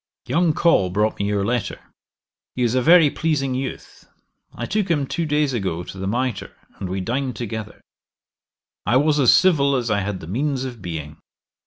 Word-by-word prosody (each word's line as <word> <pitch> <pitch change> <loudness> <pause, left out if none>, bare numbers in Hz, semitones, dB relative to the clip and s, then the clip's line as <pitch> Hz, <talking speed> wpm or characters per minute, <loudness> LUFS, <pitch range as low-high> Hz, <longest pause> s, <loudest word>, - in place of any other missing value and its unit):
'Young 170 -2 +2
Col 150 - +3
brought 105 +4 0
me 100 - 0
your 100 -1 0
letter. 120 +1 -2 0.8
He 125 - 0
is 120 -1 +1
a 130 - +2
very 165 0 +6
pleasing 140 -5 -1
youth. 130 +1 -6 0.4
I - - -5
took 205 -2 -1
him 150 -5 +1
two 165 +4 -2
days 150 -2 +1
ago 95 -7 -2
to 95 - -9
the 95 - -3
Mitre, 120 +1 -2 0.2
and 95 - -4
we 95 +1 -2
dined 125 +5 -2
together. 110 -2 -6 1.0
I 125 - +3
was 150 +2 +2
as 130 - +6
civil 140 -7 +4
as 120 -3 -1
I 105 - +2
had 100 -1 -3
the - - -9
means 130 - -1
of 125 -5 -7
being. 80 -4 -6
125 Hz, 185 wpm, -22 LUFS, 100-145 Hz, 1.0 s, very